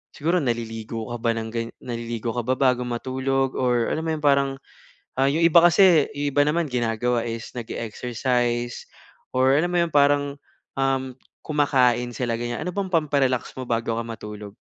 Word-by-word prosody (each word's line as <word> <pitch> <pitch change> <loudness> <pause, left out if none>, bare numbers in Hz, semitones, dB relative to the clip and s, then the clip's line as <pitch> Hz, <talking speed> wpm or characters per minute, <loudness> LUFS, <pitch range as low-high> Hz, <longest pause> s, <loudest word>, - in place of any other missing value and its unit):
siguro 170 +4 +1
naliligo 115 -3 -3
ka 120 - -3
ba 115 - +2
ng 110 0 -4
ga 115 - -1 0.2
naliligo 115 -1 -4
ka 120 - -1
ba 130 +1 +1
bago 125 -2 +2
matulog? 130 +2 -1
Or 125 -2 +1
alam 160 - -2
mo - - 0
yung 150 - -8
parang, 140 -1 +4 0.7
ah, 135 - +4
yung 160 +4 0
iba 170 0 +7
kasi 175 -3 +6
yung 145 0 -1
iba 145 - +6
naman, 160 +1 0
ginagawa 120 0 0
is 115 -1 -5
nag-e-exercise 120 +1 -2 0.5
or 130 +1 +4
alam 175 +3 0
mo - - +3
yong 170 - -1
parang, 145 0 +3 0.4
um, 135 -1 0 0.3
kumakain 130 -5 +2
sila 120 -2 -1
ganyan. 120 0 -3
Ano 180 - -2
bang 195 -2 -2
pampa-relax 140 -6 +1
mo 130 - -4
bago 115 -1 -1
ka 115 - -3
matulog? 105 -3 -8
125 Hz, 170 wpm, -24 LUFS, 120-145 Hz, 0.7 s, iba